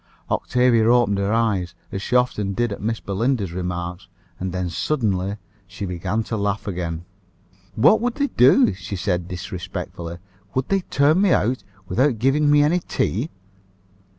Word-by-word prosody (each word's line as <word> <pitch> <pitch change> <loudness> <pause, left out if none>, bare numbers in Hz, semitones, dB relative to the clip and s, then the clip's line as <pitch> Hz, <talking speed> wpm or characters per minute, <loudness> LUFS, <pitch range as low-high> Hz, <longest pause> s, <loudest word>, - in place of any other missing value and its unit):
Octavia 125 -2 +3
opened 120 -5 +3
her 100 +1 0
eyes, 100 -6 0 0.2
as 95 -2 -4
she 125 - -2
often 105 -5 +1
did 120 +1 0
at 100 - -5
Miss 115 +1 -1
Belinda's 100 -1 -1
remarks, 90 0 -4 0.3
and 95 0 -3
then 90 0 -2
suddenly 100 - -1 0.3
she 100 +2 -6
began 95 +4 -2
to 115 - -4
laugh 100 -1 -1
again. 85 -3 -3 0.7
"What 150 - +5
would 245 0 -1
they 285 -1 0
do?" 125 -4 +5
she 100 +1 -6
said 90 -2 -1
disrespectfully. 85 -2 -6 0.4
"Would 130 0 -1
they 195 - +3
turn 155 +2 +2
me 200 -4 +4
out, 125 +4 +1 0.2
without 125 +7 +2
giving 135 +6 +2
me 145 0 +6
any 165 +5 +3
tea?" 130 - -1
105 Hz, 155 wpm, -22 LUFS, 90-125 Hz, 0.7 s, me